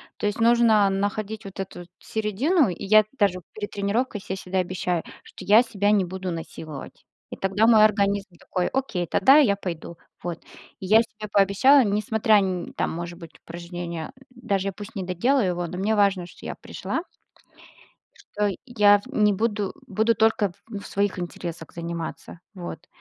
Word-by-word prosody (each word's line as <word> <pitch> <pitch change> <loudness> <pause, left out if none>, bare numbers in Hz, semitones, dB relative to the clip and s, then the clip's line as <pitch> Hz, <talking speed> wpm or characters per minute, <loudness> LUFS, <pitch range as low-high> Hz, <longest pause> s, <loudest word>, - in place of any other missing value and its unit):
То 210 - -2
есть 205 - -3
нужно 225 -3 +5
находить 205 +2 -2
вот 195 0 -10
эту, 190 - -5
вот, 175 - -13
середину, 225 - +1
и 180 - -6
я 215 +2 +6 0.2
даже 190 -3 +2
перед 210 -1 -6
тренировкой 205 +2 -1
се 190 - -4
всегда 190 0 -3
обещаю, 180 -1 -1 0.2
что - - -12
я 215 +4 +6
себя 205 -3 0
не 200 -3 +3
буду 185 0 -5
насиловать, 155 -3 -8 0.3
и - - -5
тогда 195 +3 +1
мой 220 -2 +7
организм 200 -3 +1
такой: 180 -1 -2
"Окей, 230 -10 -2
тогда 265 - +5
я 215 -10 +4
пойду",- 170 -3 -6 0.3
вот. 175 -1 -4 0.4
И - - -7
я 215 +4 +6
себе 215 -2 -8
пообещала, 205 +8 +5
несмотря 215 0 +2
нь 185 -3 -2
там, - - -1
может 170 +1 -6
быть, 165 -2 -11
упражнение, 170 +2 -6 0.2
даже 200 -5 -2
я - - -7
пусть 210 +4 -10
не 195 - -3
доделаю 195 +7 +1
его, 175 -1 -2
но 180 +2 -7
мне 210 +3 0
важно, 200 -3 +2
что 175 - -14
я - - -4
пришла. - - -4 1.4
Что 210 -1 +2
я 205 -4 +5
в 205 - -15
не 210 -4 +3
буду 205 -1 -1
буду 220 +4 +2
только 220 -3 +2 0.2
в 205 -3 -7
своих 200 -1 -1
интересах 175 -2 -6
заниматься. 170 0 -6
Вот. 175 -2 -8
200 Hz, 170 wpm, -24 LUFS, 180-215 Hz, 1.4 s, мой